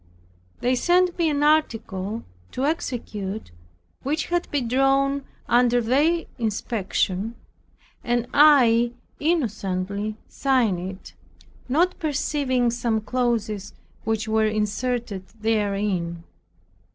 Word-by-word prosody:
They 250 +1 +2
sent 355 +6 +3
me 330 -2 +3
an 290 -1 0
article 225 -9 +1 0.3
to 260 - -1
execute, 220 - -3 0.5
which 305 +3 -2
had 350 0 0
been 275 -5 -1
drawn 270 +2 +2 0.2
under 245 0 +4
their 290 +9 +2
inspection, 210 -1 -1 0.7
and 240 0 0
I 245 -6 +6 0.3
innocently 210 - -1
signed 250 -9 +1
it, 185 +2 -8 0.6
not 345 +7 +2
perceiving 280 -5 0
some 230 -2 0
clauses 220 -4 -1 0.3
which 220 0 -1
were 220 0 +2
inserted 215 -1 -2
therein. 200 -6 -1
235 Hz, 95 wpm, -24 LUFS, 210-275 Hz, 0.7 s, I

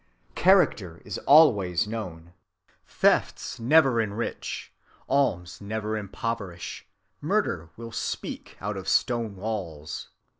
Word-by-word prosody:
Character 145 - +3
is 100 - -4
always 105 - +6
known. 90 -7 -6 0.5
Thefts 130 - +1
never 130 -1 +5
enrich; 110 +2 -4 0.3
alms 115 -13 0
never 110 +1 -3
impoverish; 100 -3 -5 0.3
murder 80 0 0
will 115 0 -8
speak 115 - -5
out 105 0 -3
of 95 0 -7
stone 115 -5 +1
walls. 95 -7 -5
105 Hz, 100 wpm, -26 LUFS, 90-115 Hz, 0.5 s, always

